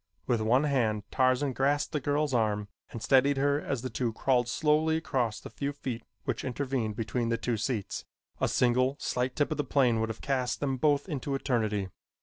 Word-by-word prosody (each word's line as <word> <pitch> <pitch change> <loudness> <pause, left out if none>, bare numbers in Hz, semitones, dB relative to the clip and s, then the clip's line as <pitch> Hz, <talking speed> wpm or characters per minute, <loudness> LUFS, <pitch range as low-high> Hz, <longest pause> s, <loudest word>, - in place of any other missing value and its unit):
With 120 -3 +1
one 120 +6 +3
hand 115 -8 +1
Tarzan 130 +1 +2
grasped 140 +3 +1
the 150 - 0
girl's 145 +1 0
arm 105 -3 +1 0.2
and 115 - -7
steadied 135 +2 +4
her 140 +2 +2
as 130 -3 -3
the 130 - -2
two 115 -1 -1
crawled 125 0 +2
slowly 155 +4 +2
across 125 -8 -1
the - - -10
few 140 0 -3
feet 130 -4 -5 0.2
which 130 -5 -2
intervened 130 -4 -2
between 115 +1 -1
the 115 - +1
two 120 0 -1
seats. 110 -2 -2 0.4
A - - +2
single 130 +2 +2
slight 125 +1 -1
tip 145 +1 +1
of 155 - -1
the 150 - +1
plane 125 -6 +2
would 110 0 0
have 110 - -5
cast 130 -3 -1
them 135 -2 -1
both 145 +3 +2
into 140 -4 -2
eternity. 110 -8 0
130 Hz, 195 wpm, -29 LUFS, 115-140 Hz, 0.4 s, steadied